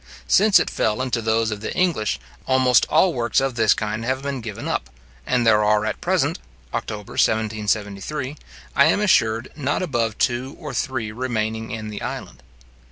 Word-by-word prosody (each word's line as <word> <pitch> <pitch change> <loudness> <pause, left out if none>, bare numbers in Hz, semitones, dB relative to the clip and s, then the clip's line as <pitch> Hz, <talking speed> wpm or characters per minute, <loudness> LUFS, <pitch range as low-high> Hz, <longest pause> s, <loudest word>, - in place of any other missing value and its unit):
Since 210 +1 +6
it - - -1
fell 105 +1 0
into 130 -2 -1
those 110 0 +1
of 105 -1 -5
the - - -4
English, 110 - +1 0.3
almost 130 -2 +4
all 185 -3 +4
works 120 -3 +1
of 135 -1 0
this 115 -2 +3
kind 105 +1 -3
have 130 +3 -1
been 140 -2 -3
given 110 -3 -6
up; - - -2 0.4
and 125 -2 +2
there 105 -2 +5
are 105 0 +3
at - - -3
present - - +1 0.3
(October 105 -2 -4
1773), 110 +5 -1 0.4
I - - +6
am - - +3
assured, 120 - +2
not 145 +3 -1
above 115 - -1
two 130 +2 -1
or 150 -5 -7
three 125 -4 -2
remaining 110 -2 -2
in 110 -2 -5
the 105 - -6
island. 65 - -6
115 Hz, 170 wpm, -22 LUFS, 110-130 Hz, 0.4 s, Since